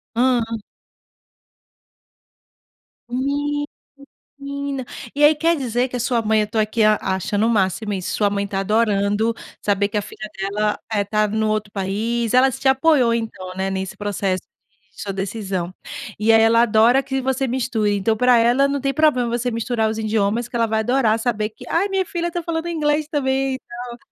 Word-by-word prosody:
Hã. 245 0 +3 2.7
Menina. 290 +3 -2 1.3
E 290 - +1
aí, 300 +1 +7
quer 330 +2 +2
dizer 250 -3 -1
que 250 - -7
a 245 - -2
sua 235 0 +1
mãe 220 0 +3
eu 210 - -1
tô 225 - -5
aqui 215 +1 +1
a 215 0 +5
achando 195 +3 0
o 230 - +2
máximo 205 0 0
isso, 185 -2 -3
sua 205 -1 +2
mãe 200 0 -1
tá 195 -1 -2
adorando 210 +1 +1 0.3
saber 200 0 +1
que 210 - -3
a - - +1
filha 215 - -8
dela, 210 +2 -1
eh, 205 -2 +1
tá 215 +1 +1
no 220 +1 0
outro 215 -1 -2
país. 215 +4 -1
Ela 260 +1 +5
te 265 - -2
apoiou 265 -3 +4
então, 220 -5 -4
né. 190 +1 -1
Nesse 190 0 -4
processo 195 -2 -2 0.5
de - - -10
sua 200 - -4
decisão. 190 -2 -3 0.5
E 215 +2 +3
aí, 225 - +6
ela 230 +1 +5
adora 235 +4 +4
que 265 0 -2
você 265 +1 0
misture. 235 -4 0
Então, 220 +3 0
pra 250 +1 +5
ela, 245 +4 +4
não 280 0 -2
tem 275 0 0
problema 275 -5 +2
você 240 +1 -1
misturar 230 -1 0
os 220 - -3
idiomas 220 +2 0
que 245 - -10
ela 230 -1 +3
vai 220 0 0
adorar 230 -1 +2
saber 220 -2 -1
que 215 - -14
"Aí, 365 +5 +2
minha 385 -1 0
filha 345 -2 -3
tá 345 - -3
falando 330 0 -3
inglês 305 -2 0
também 270 -3 0
e - - -7
tal". 240 -1 -9
230 Hz, 185 wpm, -21 LUFS, 210-265 Hz, 2.7 s, aí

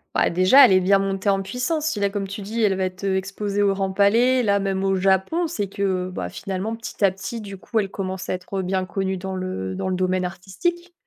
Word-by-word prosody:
Bah - - +3
déjà 185 +11 +7
elle - - +4
est 185 - +6
bien 195 +2 +4
montée 195 +1 -1
en 195 0 +1
puissance, 255 - -2
si 230 -10 -1
là 200 - +2
comme 195 -1 -3
tu 200 +2 -6
dis 220 +3 -2
elle 200 -2 +3
va 190 0 0
être, 185 +1 -6
heu, 195 -1 +1
exposée 200 +1 -2
au 200 - +4
Grand 195 -1 -1
Palais 230 +6 +4
là 200 -4 +2
même 195 -1 -1
au 195 0 +2
Japon, 190 - +2
c'est 260 -12 -3
que, 200 +1 -4 0.2
heu, 185 - -8
bah, - - -4
finalement 195 +4 -4
petit 225 -2 -2
à 190 - +4
petit 195 +4 -6
du 200 -2 -8
coup 225 - -5
elle 200 -2 -1
commence 190 -1 -4
à - - -1
être 185 +1 -4
bien 185 0 -1
connue 190 +1 -2
dans 190 +1 -5
le 95 - -4
dans 190 - -3
le 185 - 0
domaine 185 0 0
artistique. 275 - -4
195 Hz, 255 wpm, -23 LUFS, 185-205 Hz, 0.2 s, déjà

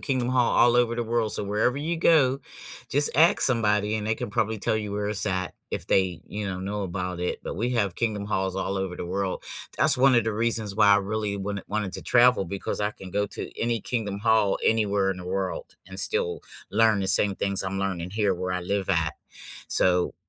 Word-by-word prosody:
Kingdom 130 -3 -1
Hall 125 -2 +2
all 120 0 +5
over 120 -1 +3
the 120 - -1
world, 115 -2 0
so - - -2
wherever 105 +5 0
you 160 +4 -2
go, 140 -5 +4 0.5
just 145 +2 +2
ask 165 +3 +5
somebody 105 -4 +2
and 105 -1 -4
they 110 - +1
can 120 -1 -5
probably 110 0 -1
tell 105 - 0
you 105 -1 -4
where 105 0 -2
it's 105 0 -1
at, 95 -2 -2 0.2
if - - -4
they, 95 -3 +1
you 105 0 -5
know, 95 -1 -4
know 100 +2 -3
about 90 -1 -4
it, 90 - -2
but - - -5
we 120 +4 0
have 100 -7 0
Kingdom 105 -3 -2
Halls 95 -2 -2
all 95 +1 -2
over 95 -2 -3
the - - -5
world. 95 +1 -3 0.3
That's 140 -1 +5
one 135 0 +5
of 120 -3 +3
the 110 - -1
reasons 110 -2 0
why 105 - +4
I - - +5
really 105 0 -2
wanted 100 0 -4
wanted 105 -2 -2
to - - -5
travel 125 -5 +4
because 100 +3 -4
I 105 0 0
can 95 -3 -11
go 105 +2 0
to - - -6
any 115 -1 0
Kingdom 105 -5 -3
Hall 110 -2 +2
anywhere 100 -3 +2
in 90 - -4
the 90 - -9
world 95 0 -3 0.2
and 95 +1 -4
still 85 -1 0 0.3
learn 110 -1 +3
the 95 - -1
same 100 +1 +4
things 100 0 -1
I'm 95 0 -3
learning 95 -3 -2
here 105 0 +1
where 90 +1 -3
I 90 - -2
live 95 +2 -2
at, 80 -4 +1 0.6
so 90 -1 +2
105 Hz, 225 wpm, -25 LUFS, 95-115 Hz, 0.6 s, all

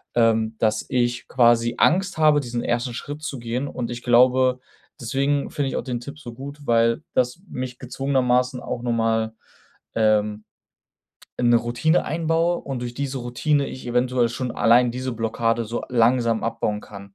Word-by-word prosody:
ähm, 115 -1 +2
dass 110 -1 +1
ich 120 -1 0
quasi 120 -1 +3
Angst 185 +2 +2
habe, 155 -2 +5
diesen 120 -3 -4
1. 120 +1 -1
Schritt 145 +5 -6
zu 140 -4 -4
gehen. 120 +4 -3
Und 120 -3 -4
ich 120 0 -6
glaube, 125 +1 +4 0.4
deswegen 140 +4 0
finde 145 -2 -1
ich - - -4
auch - - -2
den 125 -2 -3
Tipp 140 +4 -9
so 120 -6 -9
gut, 140 +4 -9
weil 115 +4 +2
das 125 +6 0
mich 125 -1 -5
gezwungenermaßen 125 -1 0
auch 120 - -4
noch 120 - -1
mal, 115 -1 0 0.6
ähm, 105 -1 +1 0.9
in 120 - +2
'ne 120 - +6
Routine 120 +8 +1
einbaue 165 +2 0
und 135 -3 -5
durch 120 -1 -4
diese 135 0 -3
Routine 140 +4 0
ich 130 - -9
eventuell 125 0 +1
schon 125 +1 -3
allein 120 +3 +4
diese 130 +1 -4
Blockade 115 0 -1
so 115 +2 -4
langsam 115 -1 +2
abbauen 110 -2 -2
kann 100 -1 -12
120 Hz, 170 wpm, -23 LUFS, 115-135 Hz, 0.9 s, ne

